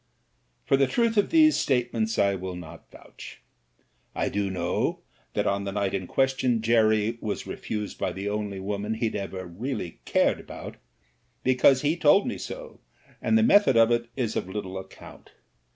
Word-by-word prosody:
For 135 - +3
the 135 0 +3
truth 230 - +1
of 205 -1 +2
these 310 -1 +5
statements 120 -4 0
I 100 0 +3
will 95 -1 -5
not 90 -3 -11
vouch. - - -12 0.8
I - - 0
do 100 -1 -1
know 85 -2 -1 0.3
that - - +1
on 100 0 0
the 100 - -3
night 100 -1 -1
in 95 -2 -3
question 130 -4 +1
Jerry 110 0 +2
was 105 - -3
re - - -5
fused 105 -2 -5
by - - -1
the 95 +2 -5
only 105 -1 -3
woman 105 +3 -3
he'd 110 0 -2
ever 95 -2 -5
really 90 0 -5
cared - - +2
about, - - -9 0.7
because 130 +1 +4
he 150 +3 +2
told 175 +4 +4
me 245 - -3
so, - - -8 0.4
and 225 - +3
the 225 - +4
method 205 - +5
of 115 +1 +5
it 120 0 0
is 120 -5 -2
of 95 - -2
little 95 -1 -5
account. 95 - -13
110 Hz, 175 wpm, -26 LUFS, 100-135 Hz, 0.8 s, these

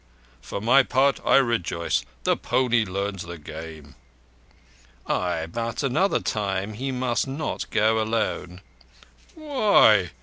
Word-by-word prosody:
For - - -6
my 120 +6 +5
part, 135 +1 +2
I - - +4
rejoice. 115 - +1 0.2
The - - +2
pony 120 -3 +1
learns 100 0 -3
the 85 0 -7
game." 80 -2 -10 1.1
"Ay, 85 -3 -1
but 115 - -4
another 140 +9 +1
time 100 -1 -2
he 135 +5 -4
must 125 0 -1
not 140 +4 -4
go 110 +1 +2
alone." 105 -5 -2 0.7
"Why? 210 - +4
110 Hz, 115 wpm, -24 LUFS, 90-130 Hz, 1.1 s, my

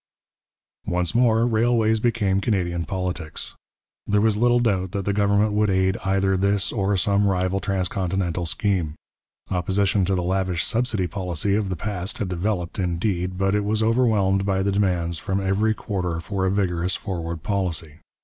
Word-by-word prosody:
Once 90 -1 0
more 115 -1 +3
railways 115 -1 +2
became 105 -5 +1
Canadian 85 -5 -1
politics. 90 -4 -4 0.5
There 105 0 +3
was 110 0 +3
little 120 +2 +3
doubt 95 -6 0
that 100 -2 -2
the 100 - +1
government 100 +1 +2
would 105 0 +2
aid 95 0 +2
either 95 0 +1
this 100 +1 +1
or 100 -2 0
some 100 +2 +2
rival 95 0 +1
transcontinental 95 -2 -1
scheme. 90 -5 -1 0.6
Opposition 95 +2 +1
to 95 +1 +1
the 90 - -1
lavish 95 -1 0
subsidy 115 -5 0
policy 90 +1 -2
of 100 -1 0
the 95 - -2
past 95 +1 -4
had 105 -6 -3
developed, 90 +1 -2
indeed, 90 0 -1
but 95 +1 +1
it 105 0 +1
was 110 +2 0
overwhelmed 110 -5 +2
by 95 -1 0
the 100 - +1
demands 90 -4 0
from 95 0 -1
every 100 +3 +1
quarter 90 -6 -3
for 95 +3 -2
a - - +1
vigorous 90 -2 0
forward 85 -5 -5
policy. 85 -6 -2
95 Hz, 160 wpm, -23 LUFS, 90-105 Hz, 0.6 s, more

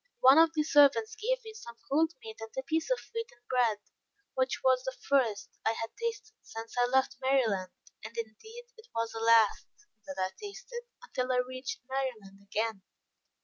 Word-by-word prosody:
One 265 +4 +8
of 325 0 +6
the 305 - +3
servants 280 -7 +5
gave - - -1
me 440 - -8
some 235 - -10
cold 320 +3 +3
meat 220 0 -8
and 225 - -6
a 265 - -1
piece 320 - -1
of - - +3 0.2
wheaten 455 - -6
bread, 245 -4 +2 0.6
which 260 0 0
was 260 -1 +4
the 260 -1 -4
first 240 -7 0
I 225 - +2
had 225 0 -4
tasted 460 -1 -4
since 225 0 -8
I 245 0 +3
left 265 +1 +2
Maryland, 230 -9 +2 0.3
and 225 +2 -9
indeed, 230 - -7
it 445 +1 -15
was 230 0 -1
the 225 - -5
last 225 -2 +4 0.4
that 190 - -6
I 185 0 0
tasted 475 +4 -7 0.2
until 255 - -2
I 250 - +2
reached 255 0 -5
Maryland 245 -8 -4
again. 210 +1 -2
255 Hz, 180 wpm, -31 LUFS, 225-315 Hz, 0.6 s, One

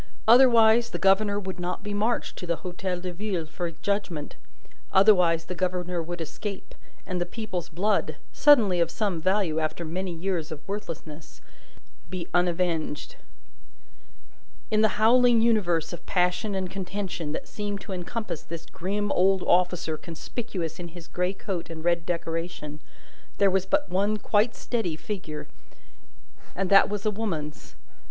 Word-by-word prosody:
Otherwise, 235 -1 +7
the - - -3
governor 200 +3 +3
would 190 -2 -6
not 180 +2 -3
be 205 -1 -4
marched 215 +4 0
to 180 - -7
the 170 - +1
Hotel 180 0 -3
de 180 0 -5
Ville 185 -3 -2
for 170 +2 -4
judgment. 165 -3 -3 0.6
Otherwise, 180 -5 +5
the - - -4
governor 180 -1 -1
would 175 +1 -5
escape, 195 +5 -6 0.3
and 180 -2 -2
the - - +4
people's 185 -2 -5
blood 185 -2 0 0.2
(suddenly 225 -12 +5
of 170 - +2
some 195 -7 -1
value, 185 -3 +1
after 160 +2 -2
many 180 +3 -3
years 170 -1 -2
of 155 -1 -8
worthlessness) 165 -6 -7 0.7
be 180 -2 -5
unavenged. 175 - 0 1.6
In 215 0 +3
the 220 - +2
howling 240 +2 +5
universe 180 -9 +2
of 175 - -8
passion 180 +3 +1
and 190 -1 -1
contention 190 -4 -4
that - - -5
seemed 205 -1 -4
to 200 - -6
encompass 185 0 -4
this 165 -1 -8
grim 205 +3 -2
old 190 0 +3
officer 175 -3 +2
conspicuous 170 +1 -5
in 175 - -5
his 170 0 -11
grey 180 +1 -1
coat 190 -4 -4
and 160 -1 -7
red 170 -1 +1
decoration, 165 -3 -3 0.6
there 200 -1 +4
was 190 0 +1
but 295 0 +2
one 200 +4 +1
quite 215 +2 +2
steady 225 -10 -2
figure, 160 -3 -6 1.1
and 195 0 -1
that 195 - +7
was 205 0 -3
a 215 - +3
woman's. 165 -9 -4
185 Hz, 150 wpm, -26 LUFS, 170-205 Hz, 1.6 s, Otherwise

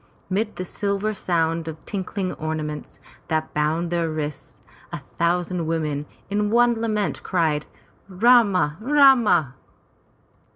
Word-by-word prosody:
Mid 215 +3 -1
the 185 - -4
silver 200 +3 -2
sound 165 -4 -1
of 160 -1 -5
tinkling 190 -1 -3
ornaments 155 -1 -5 0.3
that 155 -2 -2
bound 160 +3 0
their 170 -1 0
wrists, 150 -2 -6 0.3
a - - -4 0.2
thousand 175 0 0
women 150 -3 -2 0.2
in 205 +1 0
one 240 +2 +4
wild 230 - -3
lament, 215 -3 -1
cried, 160 -5 0 0.4
"Rama! 195 -6 +4
Rama!'' 240 - +4
175 Hz, 120 wpm, -23 LUFS, 155-210 Hz, 0.4 s, one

